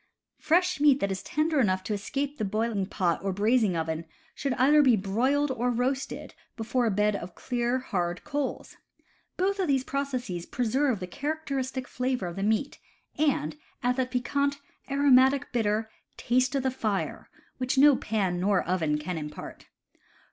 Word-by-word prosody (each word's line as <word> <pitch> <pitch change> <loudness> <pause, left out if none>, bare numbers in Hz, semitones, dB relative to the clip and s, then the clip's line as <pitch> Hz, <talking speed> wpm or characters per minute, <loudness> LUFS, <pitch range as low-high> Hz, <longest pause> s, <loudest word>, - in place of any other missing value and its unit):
Fresh 360 +1 +2
meat 285 -2 +5
that 200 - 0
is 190 0 -3
tender 305 +6 0
enough 190 -6 +2
to 210 - -2
escape 275 +8 -3
the - - 0
boil 215 +3 0
ing 195 -3 -1
pot 180 -4 0
or 195 - -1
the - - -5
braising 215 -2 +2
oven 160 0 -2 0.3
should 275 -1 -2
either 290 +4 +5
be 255 -5 +5
broiled 255 +9 +1
or 250 -1 0
roasted 255 +3 -2 0.2
before 235 +2 0
a - - +3
bed 210 +1 +2
of 175 -2 -7
clear, 245 0 -1
hard 180 -8 -2
coals. 290 -2 -4 0.6
Both 390 +2 0
of 375 - +1
these 270 -3 +2
processes 255 -11 -3
preserve 250 -1 0
the - - -2
characteristic 270 - -3
flavor 250 -5 -2
of 170 -1 -5
the 195 - -4
meat, 220 +7 0 0.4
and 255 - +1 0.3
add 250 0 +2
that 260 -1 0
piquant, 280 +3 0 0.3
aromatic 275 -1 +4
bitter 220 -2 0 0.3
"taste 255 +3 +1
of 270 - 0
the 260 - +1
fire" 215 -6 -3 0.3
which 255 +1 -1
no 285 +1 +7
pan 195 -7 -1
nor 195 0 +2
oven 165 -4 0
can 165 +2 -4
impart. 150 0 -8
245 Hz, 170 wpm, -27 LUFS, 195-275 Hz, 0.6 s, no